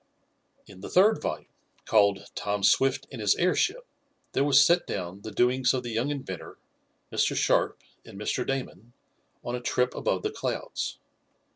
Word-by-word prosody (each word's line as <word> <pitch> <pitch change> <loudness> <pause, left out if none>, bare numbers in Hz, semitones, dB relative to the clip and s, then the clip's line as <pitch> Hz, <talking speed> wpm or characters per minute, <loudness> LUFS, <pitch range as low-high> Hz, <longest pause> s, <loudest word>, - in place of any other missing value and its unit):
In 95 -1 -14
the - - -7
third 210 +4 +4
volume, 75 0 -3 0.4
called 100 -3 +2
"Tom 100 -1 -2
Swift 135 +6 +3
and 125 -5 -7
His 105 -1 +3
Airship," 375 - +1 0.5
there 135 - +1
was 140 -1 +6
set 175 +1 +3
down 95 +1 -5
the 110 - -7
doings 125 +3 +2
of 125 - -2
the 120 - -5
young 115 +5 -1
inventor, 130 - -6 0.5
Mr. - - +1
Sharp - - +1 0.2
and 100 - -12
Mr. 105 +4 -1
Damon 120 -4 -5 0.5
on 120 - -4
a 125 - -5
trip 125 +1 0
above - - -1
the - - -1
clouds. - - -4
125 Hz, 160 wpm, -27 LUFS, 100-135 Hz, 0.5 s, was